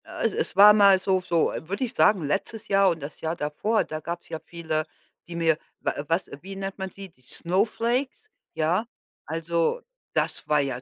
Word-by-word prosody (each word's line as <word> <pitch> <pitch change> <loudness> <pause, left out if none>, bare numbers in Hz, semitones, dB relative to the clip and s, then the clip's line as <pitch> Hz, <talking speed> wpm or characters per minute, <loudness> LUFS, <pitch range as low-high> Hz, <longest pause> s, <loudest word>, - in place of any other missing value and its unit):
Äh, - - -1
es - - -3
war 205 +1 +9
mal 200 -2 +6
so 190 0 +1
so 170 -2 +2 0.2
würde 200 +7 -2
ich 250 -1 -3
sagen, 185 - +3
letztes 210 +7 -2
Jahr 195 -1 +4
und 165 -3 -2
das 145 +2 -8
Jahr 160 +1 -1
davor, 170 +9 0
da 155 - -5
gab's 170 +2 -6
ja 160 - -4
viele, 160 -2 -3 0.4
die 170 - -7
mir 165 -2 +2 0.2
wa - - 0
was 165 +4 0
wie 195 +1 -8
nennt 195 0 -5
man 190 -1 -4
sie, 195 0 -10
die 130 - -31
Snowflakes, 230 - -1 0.3
ja? 165 +6 +1 0.4
Also, 165 - -1 0.3
das - - -1
war 150 -1 +3
ja 135 -3 -2
180 Hz, 190 wpm, -26 LUFS, 160-200 Hz, 0.4 s, war